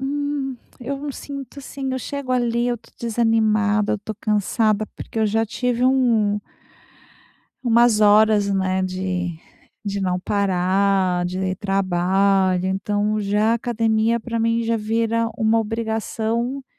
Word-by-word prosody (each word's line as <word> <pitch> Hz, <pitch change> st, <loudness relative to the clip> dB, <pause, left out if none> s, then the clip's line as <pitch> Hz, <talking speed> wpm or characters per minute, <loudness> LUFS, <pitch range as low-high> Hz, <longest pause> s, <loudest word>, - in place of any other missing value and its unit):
hum, 280 Hz, -1 st, -2 dB, 0.2 s
eu 275 Hz, +3 st, -3 dB
não 285 Hz, -1 st, -5 dB
sinto, 275 Hz, -1 st, -8 dB
assim, 270 Hz, -1 st, -5 dB
eu 260 Hz, -, -1 dB
chego 280 Hz, -1 st, -4 dB
ali, 240 Hz, -1 st, +1 dB
eu 240 Hz, -, +1 dB
estou 230 Hz, -, -22 dB
desanimada, 220 Hz, -2 st, +1 dB
eu -, -, +1 dB
estou 210 Hz, +2 st, -7 dB
cansada, 215 Hz, 0 st, +1 dB
porque 225 Hz, -, -6 dB
eu 220 Hz, -, +3 dB
já 225 Hz, +2 st, +1 dB
tive 245 Hz, +2 st, -1 dB
um 230 Hz, -6 st, +2 dB, 1.2 s
umas 235 Hz, -2 st, +4 dB
horas, 210 Hz, 0 st, +5 dB
né, 190 Hz, -1 st, 0 dB
de 185 Hz, -2 st, -3 dB, 0.5 s
de 200 Hz, 0 st, -2 dB
não 185 Hz, -1 st, 0 dB
parar, 190 Hz, -1 st, +1 dB
de 185 Hz, +1 st, -2 dB
trabalho, 190 Hz, -1 st, +1 dB
então 205 Hz, +2 st, -1 dB
já 210 Hz, +2 st, +1 dB
academia 230 Hz, -1 st, +1 dB
pra 230 Hz, 0 st, -3 dB
mim 230 Hz, +1 st, +1 dB
já 230 Hz, 0 st, 0 dB
vira 230 Hz, +1 st, 0 dB
uma 225 Hz, -1 st, +2 dB
obrigação 225 Hz, +3 st, -2 dB
220 Hz, 130 wpm, -21 LUFS, 200-235 Hz, 1.2 s, horas